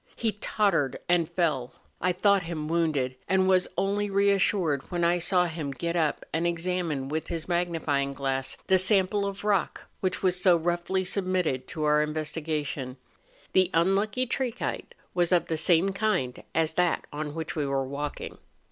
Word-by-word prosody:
He 225 Hz, -2 st, 0 dB
tottered 195 Hz, -, 0 dB
and 175 Hz, -2 st, +2 dB
fell; 155 Hz, -8 st, 0 dB, 0.3 s
I 180 Hz, -, +2 dB
thought 200 Hz, +2 st, +3 dB
him 165 Hz, -3 st, -4 dB
wounded, 155 Hz, -6 st, 0 dB
and 190 Hz, 0 st, +3 dB
was 185 Hz, -1 st, +4 dB
only 205 Hz, +1 st, 0 dB
re¬ 200 Hz, 0 st, +3 dB
assured 180 Hz, -8 st, +1 dB
when 175 Hz, -2 st, -1 dB
I 175 Hz, +1 st, +3 dB
saw 180 Hz, +1 st, +2 dB
him 160 Hz, -4 st, -4 dB
get 170 Hz, +5 st, -3 dB
up 160 Hz, -3 st, 0 dB
and 165 Hz, +2 st, +1 dB
examine 170 Hz, -5 st, -2 dB
with 155 Hz, +3 st, -3 dB
his 165 Hz, -2 st, -4 dB
magnifying 165 Hz, -6 st, 0 dB
glass 135 Hz, -1 st, -2 dB
the 190 Hz, 0 st, +4 dB
sample 200 Hz, +1 st, +2 dB
of 200 Hz, 0 st, -6 dB
rock 205 Hz, -3 st, 0 dB, 0.2 s
which 185 Hz, 0 st, -2 dB
was 185 Hz, -1 st, +1 dB
so 180 Hz, -2 st, +5 dB
roughly 175 Hz, +3 st, -1 dB
submitted 180 Hz, -9 st, -1 dB
to 155 Hz, -, -4 dB
our 150 Hz, 0 st, +4 dB
investigation; 150 Hz, -3 st, -3 dB, 0.6 s
the 185 Hz, -2 st, +4 dB
un¬ 170 Hz, +4 st, +4 dB
lucky 215 Hz, +5 st, 0 dB
trachyte 255 Hz, -1 st, -3 dB, 0.2 s
was 175 Hz, -1 st, +2 dB
of 175 Hz, -2 st, +3 dB
the 165 Hz, -, -2 dB
same 170 Hz, +3 st, +3 dB
kind 195 Hz, -, -1 dB
as 160 Hz, 0 st, +1 dB
that 180 Hz, +1 st, +1 dB
on 150 Hz, 0 st, -4 dB
which 160 Hz, +1 st, -4 dB
we 150 Hz, -3 st, -1 dB
were 135 Hz, -1 st, 0 dB
walking. 140 Hz, +2 st, -5 dB
170 Hz, 170 wpm, -27 LUFS, 150-185 Hz, 0.6 s, so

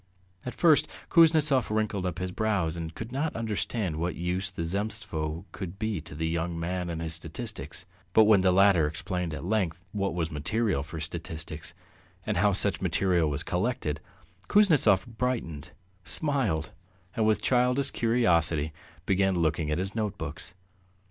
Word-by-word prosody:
At 125 Hz, -, -4 dB
first 160 Hz, -4 st, +4 dB, 0.2 s
Kuznetsov 155 Hz, -6 st, +5 dB
wrinkled 105 Hz, -3 st, 0 dB
up 90 Hz, -, -4 dB
his 90 Hz, +1 st, -3 dB
brows 95 Hz, -6 st, 0 dB
and 80 Hz, -1 st, -6 dB
could 115 Hz, +1 st, -6 dB
not 145 Hz, +4 st, -2 dB
understand 110 Hz, -5 st, -2 dB
what 85 Hz, +2 st, -2 dB
use 90 Hz, +2 st, -2 dB
the 85 Hz, -3 st, -4 dB
Zemstvo 85 Hz, -5 st, -3 dB
could 95 Hz, -1 st, -7 dB
be 110 Hz, -5 st, -2 dB
to 75 Hz, -2 st, -10 dB
the 80 Hz, +2 st, -1 dB
young 85 Hz, 0 st, -2 dB
man 90 Hz, +1 st, -2 dB
and 80 Hz, -1 st, -4 dB
his 80 Hz, 0 st, -3 dB
statistics; 85 Hz, -, -6 dB, 0.3 s
but 110 Hz, -, +7 dB
when 105 Hz, -3 st, +5 dB
the 95 Hz, 0 st, +4 dB
latter 95 Hz, -4 st, +5 dB
explained 90 Hz, +2 st, -3 dB
at 75 Hz, -, -6 dB
length 90 Hz, -4 st, -1 dB
what 100 Hz, -3 st, -1 dB
was 85 Hz, -2 st, -1 dB
material 100 Hz, +3 st, 0 dB
for 80 Hz, +2 st, -7 dB
statistics 80 Hz, 0 st, -6 dB, 0.5 s
and -, -, -1 dB
how 100 Hz, +3 st, +4 dB
such 100 Hz, +1 st, +1 dB
material 90 Hz, -2 st, +2 dB
was 75 Hz, +2 st, -2 dB
collected, 90 Hz, -, -1 dB, 0.5 s
Kuznetsov 150 Hz, -, +4 dB
brightened, 110 Hz, -, -3 dB, 0.3 s
smiled, 110 Hz, -, +1 dB, 0.4 s
and 110 Hz, -1 st, +2 dB
with 110 Hz, -, +2 dB
childish 125 Hz, +2 st, +2 dB
curiosity 85 Hz, -10 st, +2 dB, 0.3 s
began 95 Hz, 0 st, +2 dB
looking 80 Hz, -2 st, 0 dB
at 75 Hz, -, 0 dB
his 95 Hz, +2 st, -2 dB
notebooks. 100 Hz, -6 st, -4 dB
95 Hz, 155 wpm, -28 LUFS, 80-110 Hz, 0.5 s, but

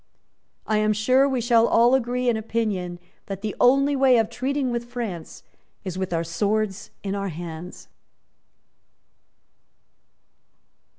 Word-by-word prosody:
"I 215 Hz, -, +1 dB
am 215 Hz, 0 st, +2 dB
sure 255 Hz, +6 st, +3 dB
we 260 Hz, -2 st, -1 dB
shall 230 Hz, -1 st, +4 dB
all 235 Hz, +2 st, +4 dB
agree 250 Hz, -1 st, 0 dB
in 240 Hz, -, +3 dB
opinion 215 Hz, -5 st, -2 dB, 0.3 s
that 195 Hz, -1 st, -6 dB
the 210 Hz, -2 st, -4 dB
only 275 Hz, +3 st, +4 dB
way 265 Hz, -2 st, +5 dB
of 225 Hz, 0 st, +1 dB
treating 260 Hz, +2 st, -1 dB
with 235 Hz, 0 st, -3 dB
France 230 Hz, -9 st, -6 dB, 0.4 s
is 185 Hz, -3 st, -5 dB
with 190 Hz, -1 st, -3 dB
our 165 Hz, -1 st, 0 dB
swords 205 Hz, +4 st, -1 dB
in 195 Hz, -1 st, -3 dB
our 200 Hz, -1 st, -2 dB
hands." 170 Hz, +1 st, -8 dB
220 Hz, 130 wpm, -24 LUFS, 195-245 Hz, 0.4 s, way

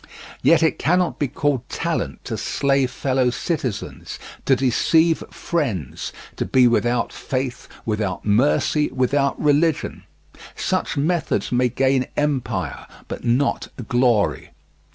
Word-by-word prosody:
Yet 165 Hz, 0 st, +5 dB
it 160 Hz, -, +2 dB
cannot 180 Hz, +3 st, +1 dB
be 145 Hz, -, +1 dB
called 135 Hz, -2 st, -1 dB
talent -, -, -3 dB
to -, -, -3 dB
slay 140 Hz, -1 st, +1 dB
fellow 130 Hz, -1 st, 0 dB
citizens, 125 Hz, -, -4 dB, 0.3 s
to 135 Hz, -, +5 dB
deceive 160 Hz, +6 st, +3 dB
friends, 115 Hz, -, -3 dB, 0.3 s
to -, -, 0 dB
be 130 Hz, -1 st, +4 dB
without 120 Hz, 0 st, +1 dB
faith, 130 Hz, -1 st, -4 dB, 0.2 s
without 105 Hz, -4 st, -2 dB
mercy, 135 Hz, +7 st, +2 dB
without 140 Hz, +2 st, +1 dB
religion; 150 Hz, +1 st, +1 dB, 0.5 s
such 185 Hz, -4 st, -1 dB
methods 160 Hz, +4 st, 0 dB
may 125 Hz, 0 st, +2 dB
gain 130 Hz, +1 st, +1 dB
empire, 145 Hz, -4 st, -1 dB, 0.2 s
but -, -, -6 dB
not 125 Hz, +4 st, +1 dB, 0.2 s
glory. 120 Hz, -4 st, +2 dB
135 Hz, 115 wpm, -22 LUFS, 120-150 Hz, 0.5 s, Yet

